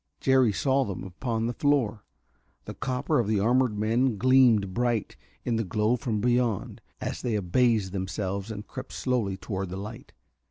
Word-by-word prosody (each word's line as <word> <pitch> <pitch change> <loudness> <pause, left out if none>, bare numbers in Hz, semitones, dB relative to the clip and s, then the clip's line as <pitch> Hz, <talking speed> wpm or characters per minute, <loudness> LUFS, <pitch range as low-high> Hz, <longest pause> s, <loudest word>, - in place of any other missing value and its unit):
Jerry 130 -4 +4
saw 135 +6 +1
them 100 -7 -5
upon 110 +5 -3
the 120 - -1
floor. 120 -8 +1 0.6
The - - -6
copper 130 +3 -1
of 115 - 0
the 105 -1 +1
armored 120 +1 +2
men 115 +2 +1
gleamed 120 -5 +4
bright 120 -2 -1 0.3
in 115 -2 0
the 115 - 0
glow 105 +5 +1
from 120 -4 -2
beyond, 120 -3 0 0.2
as - - -4
they 120 -3 -1
abased 105 +1 +2
themselves 95 +1 -3
and 105 -1 -6
crept - - -8
slowly 115 -7 -1
toward 95 -2 -4
the 95 - -5
light. 105 +4 -8
115 Hz, 165 wpm, -27 LUFS, 100-125 Hz, 0.6 s, Jerry